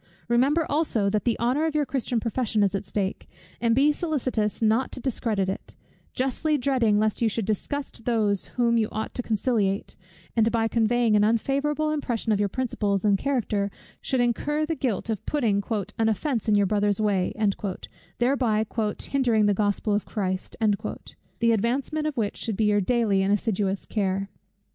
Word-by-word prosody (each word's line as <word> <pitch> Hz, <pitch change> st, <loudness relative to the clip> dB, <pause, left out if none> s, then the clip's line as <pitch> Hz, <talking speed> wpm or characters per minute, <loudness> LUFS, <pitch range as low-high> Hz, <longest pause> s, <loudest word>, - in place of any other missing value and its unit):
Remember 275 Hz, +7 st, +3 dB
also 245 Hz, -10 st, +1 dB
that 210 Hz, -1 st, -1 dB
the 235 Hz, -, +1 dB
honour 260 Hz, +7 st, +1 dB
of 310 Hz, -, -3 dB
your 300 Hz, -1 st, +2 dB
Christian 255 Hz, -2 st, -1 dB
profession 225 Hz, -1 st, 0 dB
is 200 Hz, -1 st, +1 dB
at 200 Hz, +1 st, -3 dB
stake, 195 Hz, -1 st, -3 dB, 0.3 s
and 230 Hz, -1 st, +3 dB
be 285 Hz, +3 st, +5 dB
solicitous 260 Hz, -, -1 dB
not 225 Hz, +3 st, +2 dB
to -, -, -5 dB
discredit 225 Hz, -6 st, -1 dB
it: 190 Hz, -, -5 dB, 0.4 s
justly 270 Hz, +4 st, 0 dB
dreading 250 Hz, -6 st, +2 dB
lest 215 Hz, +1 st, 0 dB
you 230 Hz, -, +3 dB
should 220 Hz, 0 st, -2 dB
disgust 230 Hz, +4 st, -3 dB
those 215 Hz, -5 st, +1 dB
whom 235 Hz, -1 st, +3 dB
you 215 Hz, -, 0 dB
ought 220 Hz, +1 st, -4 dB
to -, -, -2 dB
conciliate; 215 Hz, -3 st, 0 dB, 0.4 s
and 225 Hz, 0 st, +3 dB
by 225 Hz, -1 st, +1 dB
conveying 230 Hz, 0 st, +2 dB
an 210 Hz, -, +4 dB
unfavourable 280 Hz, +7 st, +1 dB
impression 240 Hz, -7 st, -1 dB
of 205 Hz, -, +2 dB
your 205 Hz, -1 st, +1 dB
principles 205 Hz, -5 st, -1 dB
and 200 Hz, -2 st, +3 dB
character, 220 Hz, -7 st, 0 dB, 0.3 s
should 260 Hz, -2 st, 0 dB
incur 295 Hz, +6 st, 0 dB
the 325 Hz, -, -1 dB
guilt 245 Hz, -, -2 dB
of 215 Hz, -, -3 dB
putting 220 Hz, -9 st, +1 dB, 0.4 s
an 225 Hz, 0 st, +3 dB
"offence 230 Hz, 0 st, -1 dB
in 210 Hz, -, +4 dB
your 205 Hz, -1 st, +4 dB
brother's 205 Hz, 0 st, +1 dB
way;" 200 Hz, -4 st, +1 dB, 0.9 s
thereby 240 Hz, -4 st, +2 dB, 0.4 s
"hindering 240 Hz, -6 st, +2 dB
the 205 Hz, -, +3 dB
Gospel 205 Hz, +1 st, 0 dB
of 205 Hz, -, 0 dB
Christ," 185 Hz, -3 st, -3 dB, 0.8 s
the 230 Hz, 0 st, +3 dB
advancement 260 Hz, +8 st, 0 dB
of 300 Hz, -, -4 dB
which 210 Hz, -3 st, -1 dB
should 220 Hz, -4 st, -3 dB
be 220 Hz, -, +2 dB
your 205 Hz, -1 st, +3 dB
daily 210 Hz, -2 st, +2 dB
and 195 Hz, +1 st, +1 dB
assiduous 200 Hz, -2 st, 0 dB
care. 195 Hz, -2 st, -1 dB
225 Hz, 170 wpm, -25 LUFS, 205-255 Hz, 0.9 s, be